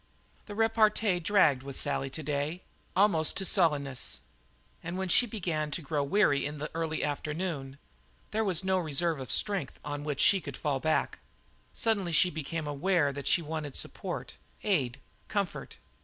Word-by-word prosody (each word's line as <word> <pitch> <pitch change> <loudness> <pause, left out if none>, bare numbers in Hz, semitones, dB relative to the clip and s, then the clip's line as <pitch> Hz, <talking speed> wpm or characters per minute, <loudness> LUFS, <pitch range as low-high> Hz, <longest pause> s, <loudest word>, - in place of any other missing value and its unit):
The 205 - -7
repartee 220 -3 +3
dragged 160 -7 +3
with 135 0 -7
Sally 140 -1 0
to 155 +4 -7
day, 145 +4 -2 0.3
almost 180 -5 +3
to 195 - 0
sullenness, 145 - +1 0.6
and 170 +3 -5
when 190 -1 -2
she 245 +7 +5
began 170 -8 -2
to 150 - -4
grow 145 0 -1
weary 140 -2 +3
in 145 +1 -3
the 150 +1 -5
early 160 -1 -2
afternoon, 150 -2 -3 0.5
there 220 +1 +1
was 190 -4 +2
no 190 0 +2
reserve 155 -4 0
strength 195 -9 +1
on 145 0 -4
which 145 -2 -3
she 195 +4 +5
could - - -7
fall 145 -3 -1
back. 155 +2 0 0.6
She - - -9
suddenly 200 -7 +2 0.2
became 160 +1 -4
aware 145 0 +1
that 140 -1 -6
she 170 - +3
wanted 155 -3 -5
support, - - -2 0.3
aid, 140 - 0 0.3
comfort. 200 -3 -3
160 Hz, 155 wpm, -30 LUFS, 145-190 Hz, 0.6 s, she